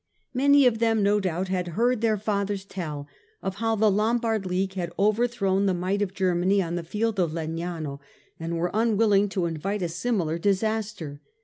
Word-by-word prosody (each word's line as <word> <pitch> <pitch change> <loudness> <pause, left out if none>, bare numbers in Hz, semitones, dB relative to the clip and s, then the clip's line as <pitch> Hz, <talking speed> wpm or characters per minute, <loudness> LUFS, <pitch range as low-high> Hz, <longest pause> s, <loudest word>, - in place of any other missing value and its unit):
Many 280 +2 +5
of 230 -3 +3
them 225 -2 +2
no 205 +1 +3
doubt 185 -1 -2
had 180 -1 -1
heard 240 0 +2
their 220 -2 +2
fathers 200 -1 -2
tell 150 -7 -5 0.4
of 195 0 -3
how 225 +1 +1
the 215 0 +3
Lom 215 +4 +2
bard 225 -4 -1
League 190 +1 -1
had 175 -3 -3
overthrown 200 -2 +2
the 185 - +2
might 185 +3 -1
of 195 -1 -2
Germany 185 +1 +2
on 170 -3 -1
the 175 - -1
field 215 +4 -1
of 170 -4 +1
Legnano, 160 -3 -4 0.4
and 165 +1 -3
were 175 +1 -1
unwilling 210 -2 +3
to 185 -2 -1
invite 185 +5 -2
a - - +1
similar 170 -3 -1
disaster. 200 -6 -1
195 Hz, 185 wpm, -26 LUFS, 175-220 Hz, 0.4 s, Many